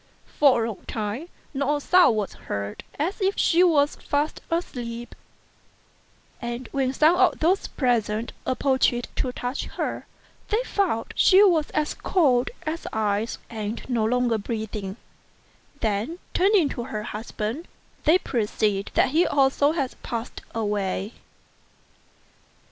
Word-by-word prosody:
For 260 -6 +3
a - - -1
long 220 - -7
time 220 +9 -4 0.2
not 280 +1 +1
a - - -1
sound 355 -5 +5
was 210 -2 -2
heard, 100 0 -5
as 350 +8 -2
if 390 +1 +1
she 345 +1 +4
was 300 -5 +3
fast 290 +2 -1
asleep; 240 -8 -4 1.3
and 240 0 -4
when 265 -2 0
some 310 +5 +4
of 375 -1 +4
those 360 +5 +2
present 230 -3 0
approached 260 -2 +1
to 255 - 0
touch 245 +2 -3
her, - - -4 0.4
they 450 +3 +1
found 380 - -1
she 385 +2 +6
was 335 -7 +3
as 305 0 +1
cold 265 -9 +2 0.2
as 315 +2 -3
ice, 215 +1 -1
and 220 0 -5
no 240 -4 0
longer 240 0 +1
breathing; 215 -2 -4 0.8
then, 220 +9 -1 0.2
turning 385 -4 +4
to 240 -3 -4
her 215 -5 -4
husband, 220 +7 -5 0.4
they 320 +4 +6
perceived 210 - -1
that - - +4
he 330 +6 +3
also 285 +2 +3
had 275 -6 -2
passed 230 0 -5
away. 205 -1 -1
250 Hz, 130 wpm, -25 LUFS, 220-310 Hz, 1.3 s, she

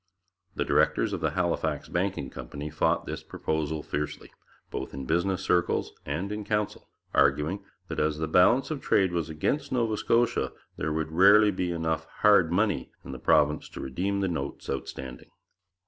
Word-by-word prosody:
The - - -1
directors - - +2
of - - -3
the - - +2
Halifax - - 0
Banking 90 -7 -2
Company 75 +1 -7
fought 80 - +1
this - - -5
proposal 80 -1 -3
fiercely, 75 +1 -4 0.4
both - - -5
in 70 -1 -5
business 85 +6 0
circles 90 -1 +1
and 85 +8 -2
in 105 0 -3
the 105 - -12
Council, 105 -1 -2 0.2
arguing 75 +7 +2 0.2
that - - -4
as 75 0 +1
the 80 0 -2
balance 90 - +4
of 150 - -3
trade 95 -2 +2
was 85 -2 -2
against 80 - -1
Nova 115 -4 +1
Scotia, 115 +2 +1 0.2
there 80 - -2
would 80 0 -2
rarely 100 +5 +6
be 90 -2 -2
enough 80 -1 -1 0.2
'hard 100 -6 +5
money' 100 - +1 0.2
in - - -7
the 65 - -7
province 75 +3 +2
to - - -9
redeem 95 +9 -2
the 95 - +1
notes 70 -6 -4
outstanding. 65 -1 -6
85 Hz, 170 wpm, -27 LUFS, 75-100 Hz, 0.4 s, rarely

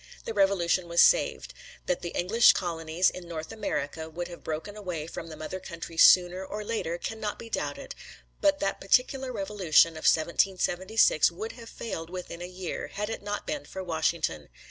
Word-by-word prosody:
The 225 - -3
Revolution 195 -3 +2
was 170 0 0
saved. - - +4 0.3
That 180 - -1
the 170 - -4
English 220 +7 +5
colonies 170 -1 0
in 180 -1 -9
North 160 -2 -6
America 160 -7 -3
would 175 +2 -5
have 175 - -11
broken 160 +6 -5
away 180 -7 -5
from 165 0 -7
the 160 - -8
mother 155 +5 -6
country 170 -2 -8
sooner 180 +2 +6
or 210 +2 -5
later 210 -6 -2
cannot 215 +2 -4
be 230 - -10
doubted, - - -4 0.5
but 295 -1 +3
that 195 0 -1
particular 255 +5 +2
Revolution 195 -7 +3
Of 160 -1 -8
1776 185 +2 +3
would 205 +6 -6
have 230 -1 -12
failed 165 -8 -6
within 180 -1 -7
a 175 - -5
year, 180 -1 -5
had 210 +2 -4
it - - -5
not 205 0 -4
been 300 -2 -3
for 190 - -7
Washington. 160 - -1
180 Hz, 175 wpm, -28 LUFS, 165-210 Hz, 0.5 s, sooner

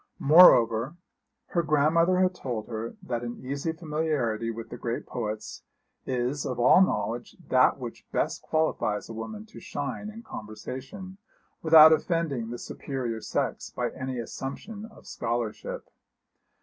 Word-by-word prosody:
Moreover, 130 -5 +6 0.5
her 170 - +1
grandmother 160 +4 +3
had 185 0 +3
told 120 -10 -5
her 115 0 -5
that 120 -2 -3
an 120 0 -5
easy 140 +5 -2
familiarity 150 -9 -1
with 115 0 -6
the - - -7
great 120 0 -3
poets 110 -3 -5 0.5
is 130 +3 -1
of 125 -2 -3
all 125 +9 +6
knowledge 120 - -1
that - - +4
which - - -8
best - - -1
qualifies 155 -10 -1
a - - -6
woman 210 - -7
to 220 - -13
shine 145 +9 -5
in 225 +2 -10
conversation, 130 - -8 0.4
without 160 -1 +9
offending 155 -7 -1
the 120 - -5
superior 120 -4 -5
sex - - -2
by - - -3
any 130 -1 -5
assumption 165 - -6
of 220 - -16
scholarship. 115 -2 -4
135 Hz, 135 wpm, -27 LUFS, 115-165 Hz, 0.5 s, without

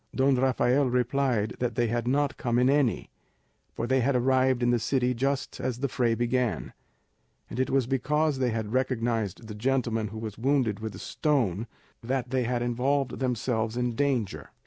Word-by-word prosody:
Don 135 0 +3
Rafael 130 +1 +2
replied 125 -3 +1
that 120 -3 -1
they 120 - +2
had 120 +1 -1
not 140 +2 +1
come 120 -2 -1
in 125 +2 +4
any, 140 -5 +1 0.6
for 115 - -2
they 130 +2 +2
had 130 +2 +1
arrived 130 0 +2
in 120 - +3
the 120 - +2
city 125 +1 +1
just 135 +3 -2
as 125 -2 -2
the 140 +2 -1
fray 120 -3 +1
began; 120 0 -1 0.8
and 125 - -5
it 130 - +1
was 135 -2 +2
because 140 +3 0
they 130 -2 +2
had 110 -1 -3
recognised 115 -5 -1
the 110 - -6
gentleman 115 -1 0
who 110 +2 -8
was 110 -2 -6
wounded 130 -5 +1
with 110 -1 -5
a - - -8
stone 120 - 0 0.3
that 125 +1 -2
they 130 -2 +1
had 120 0 -1
involved 130 +3 0
themselves 120 -3 -1
in 125 -1 0
danger. 125 -5 -1
125 Hz, 180 wpm, -27 LUFS, 115-135 Hz, 0.8 s, in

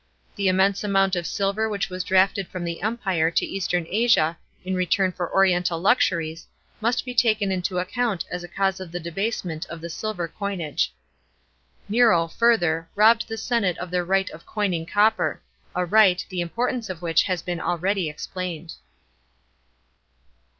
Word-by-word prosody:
The 200 -2 0
immense 190 +2 +2
amount 195 -2 +2
*>f 175 -1 -2
silver 200 +2 0
which 200 -2 -2
was 185 -1 -3
drafted 190 0 +2
from 185 -1 -6
the 170 -1 -4
Empire 195 -7 0
to 165 - +1
Eastern 180 -3 -1
Asia 205 -6 +3 0.3
in 190 - -2
return 185 +1 +1
for 175 -1 -4
oriental 180 -3 +2
luxuries, 165 -5 +1 0.3
must 235 +3 0
be 250 - -5
taken 215 -5 +2
into 180 0 -2
account 200 +1 -1
as 180 0 -4
a - - -7
cause 195 +1 -1
of 185 -3 -8
the 175 - -4
debasement 175 -1 -3
of 170 - -8
the 170 +1 -7
silver 180 -2 -3
coinage. 170 - -2 1.0
Nero, 210 -6 +4
further, 175 -6 +2
robbed 225 +2 +5
the 225 0 -5
senate 220 -6 0
of 180 0 -6
their 180 -1 +1
right 195 +2 +1
of 165 - -12
coining 185 -6 -2
copper 215 +3 +2 0.2
— - - -35
a 180 0 +1
right, 190 -1 +4
the 185 -2 -2
importance 235 +6 -2
of 180 -2 -6
which 165 -1 +3
has 185 -4 -2
been 175 -2 -3
already 180 0 0
explained. 170 +1 -6
185 Hz, 165 wpm, -24 LUFS, 170-205 Hz, 1.0 s, robbed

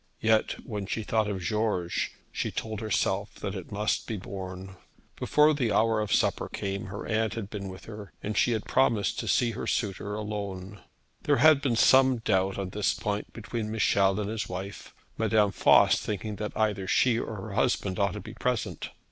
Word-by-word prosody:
Yet, 110 0 +1
when 105 -5 -4
she 110 - -2
thought 110 0 +1
of 95 -2 -3
George, 105 -5 -1 0.2
she - - -2
told 110 -2 -4
herself 110 -3 -1
that - - -5
it - - -7
must 105 +1 -1
be 110 - -3
borne. 95 0 -7 0.4
Before 150 +1 +4
the 125 -7 0
hour 110 0 +3
of 105 - -3
supper - - +1
came, 100 -1 -4
her 100 +2 -6
aunt 110 -1 0
had 105 -3 -5
been 100 -2 -5
with 95 0 -10
her, 105 -2 -9
and 105 +1 -3
she 120 - +3
had 110 - -2
promised 115 -6 +2
to - - -4
see 120 -2 +2
her 115 - -5
suitor 105 -1 -2
alone. 100 -2 -5 0.4
There - - +2
had 150 +2 +6
been 130 -4 +1
some 130 +2 +5
doubt 95 -4 +1
on 95 -2 -3
this 105 +1 0
point 105 0 -3
between 115 -1 -5
Michel 100 -2 +2
and 105 - -2
his 110 0 -3
wife, 95 +2 -6 0.3
Madame 105 -2 +3
Voss - - +5
thinking 105 0 -4
that 105 +1 -5
either 105 -3 0
she 120 +2 +3
or 110 - -4
her 100 +1 -7
husband 100 -4 0
ought 100 -2 +2
to - - -5
be - - -9
present. - - -2
105 Hz, 190 wpm, -28 LUFS, 100-110 Hz, 0.4 s, had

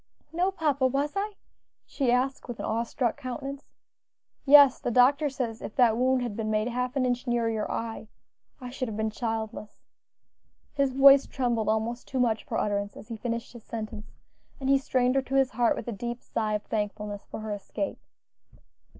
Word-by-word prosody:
"No, 355 +3 +2
papa, 295 -8 +1
was 280 +3 -1
I?" 415 +2 -2 0.5
she 265 -4 0
asked 260 +2 0
with 240 -2 -6
an - - -3
awe 225 +1 0
struck 235 0 -1
countenance. 275 +2 -6 0.8
"Yes, 285 -2 +8
the - - -2
doctor 275 +5 +4
says 240 -5 -4
if - - -7
that 240 -4 +4
wound 255 +1 +2
had 235 -4 -4
been 215 0 -3
made 215 +2 +1
half 250 +2 -2
an 265 -2 +2
inch 245 +1 -1
nearer 235 -1 +1
your 220 -1 -2
eye 225 -1 -4 0.5
I 250 -2 -7
should 255 0 -3
have 215 -2 -5
been 220 0 -1
childless." 220 -2 -5 0.9
His 280 -2 +1
voice 275 +1 +7
trembled 240 -5 -1
almost 220 +2 -1
too 265 - -3
much 225 -3 +1
for - - -3
utterance 200 -1 -1
as - - -12
he 230 - -4
finished 230 +1 -4
his 235 -3 -12
sentence, 220 -2 -6 0.5
and 270 -1 -2
he 275 0 +5
strained 255 -2 +1
her 270 - +2
to 265 +1 -4
his 270 -1 +3
heart 235 +1 +2
with - - -7
a - - -2
deep 240 +3 -4
sigh 215 -2 -1
of 210 - -3
thankfulness 210 -1 -4
for - - -6
her 215 0 -5
escape. 205 +8 -4
245 Hz, 195 wpm, -27 LUFS, 220-270 Hz, 0.9 s, Yes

